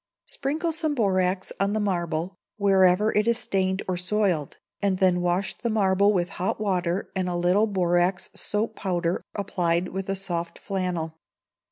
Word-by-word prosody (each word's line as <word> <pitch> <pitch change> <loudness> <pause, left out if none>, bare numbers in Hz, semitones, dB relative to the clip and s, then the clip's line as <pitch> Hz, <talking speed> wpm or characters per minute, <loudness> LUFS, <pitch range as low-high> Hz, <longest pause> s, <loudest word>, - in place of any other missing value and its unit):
Sprinkle 310 +5 -2
some 315 -2 0
borax 185 -4 +1
on 200 +1 +1
the 215 - 0
marble, 175 -2 -1 0.2
wherever 195 0 +4
it 210 +1 +2
is 235 -1 +3
stained 190 -3 0
or 185 -1 -1
soiled, 180 -5 0 0.2
and 195 -2 +1
then 185 -2 +3
wash 180 +2 0
the 235 - -3
marble 200 -2 +3
with 180 -3 0
hot 190 - -1
water 185 -3 -1
and 185 -1 0
a 175 - -2
little 180 +5 +3
borax 180 -1 +1
soap 220 +1 -2
powder, 175 -2 -1
applied 180 -3 0
with 190 +1 -5
a 195 - 0
soft 170 -3 -2
flannel. 175 -5 -3
190 Hz, 160 wpm, -25 LUFS, 175-205 Hz, 0.2 s, wherever